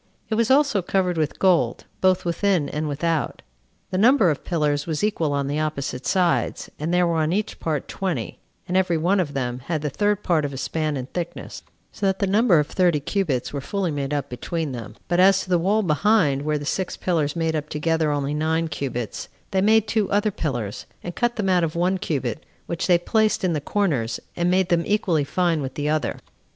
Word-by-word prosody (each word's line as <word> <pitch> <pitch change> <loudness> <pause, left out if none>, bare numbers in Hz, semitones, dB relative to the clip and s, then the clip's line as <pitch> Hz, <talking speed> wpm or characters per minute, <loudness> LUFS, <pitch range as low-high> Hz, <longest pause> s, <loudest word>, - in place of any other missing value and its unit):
It - - -1
was 225 0 +2
also 270 -6 +4
covered 180 0 0
with 155 -2 -1
gold, 170 -11 +2 0.2
both 185 -1 +3
within 175 -2 +1
and 150 +1 -2
without. 155 0 -1 0.5
The 185 - 0
number 220 - +5
of 145 - -4
pillars 150 -4 0
was 160 +1 -2
equal 170 -8 +1
on 140 -1 0
the 145 +2 -1
opposite 140 -4 -3
sides, 180 +3 +1
and 155 +3 -2
there 180 0 +3
were 170 -1 0
on 155 0 +1
each 205 +3 -2
part 155 -4 -2
twenty, 190 -3 -3 0.3
and 180 - -2
every 185 -3 +2
one 180 +5 +2
of 145 -6 -2
them 125 -2 -2
had 155 -2 -2
the 150 - -1
third 205 +4 0
part 165 -4 +2
of 140 -1 -3
a - - -5
span 155 +2 -2
in 130 - -4
thickness; 170 +5 -6 0.3
so 200 - -2
that 190 0 +1
the 200 - 0
number 200 -1 +4
of 150 - +3
thirty 175 -1 +2
cubits 145 -5 -1
were 140 - -3
fully 195 +2 -2
made 140 -1 -3
up 145 -1 -1
between 155 +5 -3
them; 115 -5 -7
but 175 0 +1
as 195 +1 +5
to 185 - -9
the 175 - +4
wall 205 +5 +2
behind, 155 -4 +2
where 150 +1 0
the 145 - -6
six 185 +4 -2
pillars 160 -5 0
made 160 -1 0
up 155 0 -3
together 160 +1 0
only 145 -1 -1
nine 160 +2 0
cubits, 125 -6 -4 0.2
they 190 - +2
made 220 +1 +4
two 210 -2 0
other 210 +1 +2
pillars, 120 - -4 0.2
and 175 - -6
cut 240 -1 0
them 205 -3 -1
out 180 -2 +3
of 160 -1 -1
one 180 +2 +1
cubit, 135 - -2 0.2
which 170 - -3
they 175 -2 +6
placed 215 +5 +1
in 180 -2 +2
the 150 - -1
corners, 140 - 0 0.2
and 175 0 +1
made 185 0 +2
them 170 -1 +3
equally 180 -7 +1
fine 170 +1 0
with 135 -1 -5
the 145 0 -2
other. 155 0 0
165 Hz, 215 wpm, -23 LUFS, 145-190 Hz, 0.5 s, they